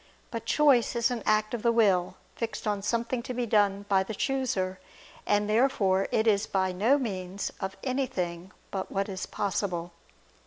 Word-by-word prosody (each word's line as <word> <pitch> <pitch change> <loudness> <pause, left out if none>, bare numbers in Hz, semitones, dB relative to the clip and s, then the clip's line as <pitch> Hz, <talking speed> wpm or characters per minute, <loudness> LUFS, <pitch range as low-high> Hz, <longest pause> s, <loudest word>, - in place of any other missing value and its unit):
But 230 -1 -5
choice 275 -6 +4
is 235 +1 +2
an 240 -2 -2
act 215 +1 +2
of 240 - -2
the 235 - +3
will, 195 -6 +3 0.2
fixed 225 -2 -4
on 205 -2 0
something 235 +4 -1
to 250 +1 -6
be 245 0 0
done 205 -2 +2
by 195 -2 +3
the 205 +3 -4
chooser. 195 -9 -1 0.5
And 205 0 +2
therefore 210 -5 +2
it 220 - +2
is 215 -1 +3
by 190 -1 0
no 220 +10 +3
means 195 -6 -4
of 190 0 -4
anything 190 -9 -2 0.2
but 190 -1 -4
what 195 0 -1
is 190 -2 -5
possible. 180 -4 -2
210 Hz, 170 wpm, -28 LUFS, 190-235 Hz, 0.5 s, choice